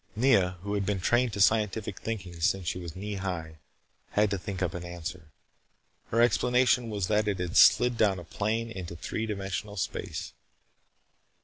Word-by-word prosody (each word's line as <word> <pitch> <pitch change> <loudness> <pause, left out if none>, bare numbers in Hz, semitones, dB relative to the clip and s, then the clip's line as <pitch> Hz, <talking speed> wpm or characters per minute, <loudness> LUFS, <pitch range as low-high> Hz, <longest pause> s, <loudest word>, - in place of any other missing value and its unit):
Nea, 100 -7 +3
who 100 0 -3
had 100 -1 0
been 100 0 -1
trained 120 +6 +2
to 100 - -4
scientific 105 -1 +2
thinking 95 -7 -5
since 90 +1 +1
she 90 - -1
was 85 -3 -7
knee 100 +1 -4
high, 85 -5 -5 0.5
had 105 0 +3
to 100 - 0
think 95 0 -4
up 85 - -1
an 90 - -5
answer. 85 -1 -7 0.8
Her 115 +1 +3
explanation 125 0 +3
was 100 -3 -1
that 105 +2 +1
it 100 -2 0
had 90 -2 -4
slid 125 -1 +6
down 100 -4 +3
a 90 - -7
plane 110 +6 -2
into 90 -5 -6
three 110 +6 -4
dimensional 100 0 -4
space. 90 - -4
100 Hz, 175 wpm, -28 LUFS, 90-110 Hz, 0.8 s, slid